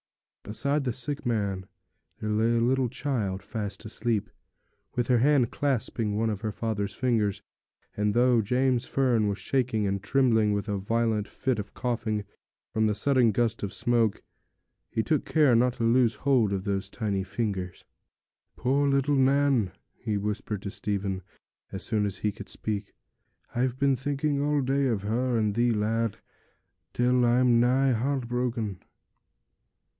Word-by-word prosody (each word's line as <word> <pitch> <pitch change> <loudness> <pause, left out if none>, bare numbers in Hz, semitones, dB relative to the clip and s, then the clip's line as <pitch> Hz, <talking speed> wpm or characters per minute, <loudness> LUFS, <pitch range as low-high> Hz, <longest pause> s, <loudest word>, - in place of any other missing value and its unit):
Beside 140 +7 0
the 125 - 0
sick 135 +4 -4
man 100 -5 -1 0.5
there 105 - -2
lay 115 +2 +2
a - - +3
little 125 +1 +2
child 105 -9 -2
fast 105 0 -5
asleep, 110 -1 -2 0.6
with 120 -2 0
her 125 -2 +4
hand 135 -2 +3
clasping 115 -6 -1
one 110 +1 +1
of 105 -1 -4
her 110 -1 -2
father's 100 -2 -3
fingers; 105 -5 0 0.5
and 105 0 +1
though 120 -1 +4
James 125 +3 +1
Fern 120 -6 +2
was 100 0 -1
shaking 125 -5 0
and 100 0 -1
trembling 110 -3 +3
with 100 +2 -2
a 105 - -1
violent 110 +1 0
fit 130 -4 -2
of 100 0 -7
coughing 110 -4 -2 0.5
from 110 0 +2
the 105 - 0
sudden 130 -1 +3
gust 115 +1 0
of 100 - -3
smoke, 115 -3 +1 0.7
he 110 - -1
took 155 +2 +1
care 150 -6 +4
not 125 +1 +3
to 115 - -3
loose 115 0 +3
the - - -22
hold 125 -7 +3
of 95 -1 -2
those 100 -1 -2
tiny 100 -4 -2
fingers. 95 -3 -4 0.7
'Poor 140 +3 +2
little 140 +1 +2
Nan!' 135 -6 +3 0.2
he 105 -2 -3
whispered 105 0 -3
to 100 - -4
Stephen, 100 -2 -2 0.5
as 95 - -5
soon 105 -3 0
as 100 -1 -5
he 105 - -1
could - - -10
speak. 105 -2 -4 0.6
'I've 125 +1 0
been 140 0 +3
thinking 140 +2 -1
all 145 0 +1
day 135 +1 +1
of 110 -5 -1
her 120 +3 0
and 105 -2 +1
thee, 120 +2 +2
lad, 110 0 0 0.7
till 125 0 +2
I'm 120 0 +4
nigh 130 +3 +3
heart 130 +2 -1
broken.' 120 -5 -2
115 Hz, 160 wpm, -27 LUFS, 105-130 Hz, 0.7 s, her